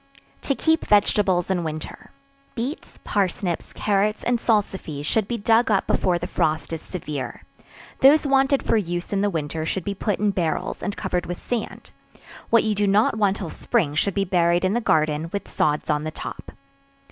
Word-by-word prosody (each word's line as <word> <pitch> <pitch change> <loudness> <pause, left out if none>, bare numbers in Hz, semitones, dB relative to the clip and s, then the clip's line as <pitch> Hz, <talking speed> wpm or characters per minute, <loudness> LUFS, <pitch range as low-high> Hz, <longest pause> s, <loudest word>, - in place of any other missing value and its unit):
To 275 - 0
Keep 320 +2 +1
Vegetables 195 -3 +3
in 180 -2 0
Winter. 155 -1 -6 0.5
Beets, 250 +7 -5
parsnips, 185 -3 -1
carrots 210 +1 0
and 240 -1 +1
salsify 195 -10 -1
should 215 +4 +1
he 240 - -1
dug 225 +3 +3
up 200 -3 +2
before 180 -2 +1
the 175 - -4
frost 155 -3 -1
is 160 - -4
severe; 145 -8 -6 0.6
those 290 +3 +6
wanted 270 0 +3
for - - +2
use 175 -2 -3
in 195 - +1
the 205 - +2
winter 160 -2 -3
should 170 +3 -2
be 200 - -2
put 205 +1 -1
in 210 0 +1
barrels, 170 -5 -2
and 200 - -3
covered 180 -1 -2
with 175 0 -4
sand; 240 -3 -5 0.6
what 230 - +5
you 220 - +1
do 205 0 +1
not 205 +3 +3
want 200 -1 +2
till 180 -6 -5
spring 145 -3 0
should 180 +5 0
be 195 - +1
buried 175 0 +2
in 185 - +1
the 240 - 0
garden, 155 -3 +1
with 200 - -4
sods 150 0 0
on 150 0 0
the 155 - -2
top. - - -8
195 Hz, 185 wpm, -23 LUFS, 165-215 Hz, 0.6 s, those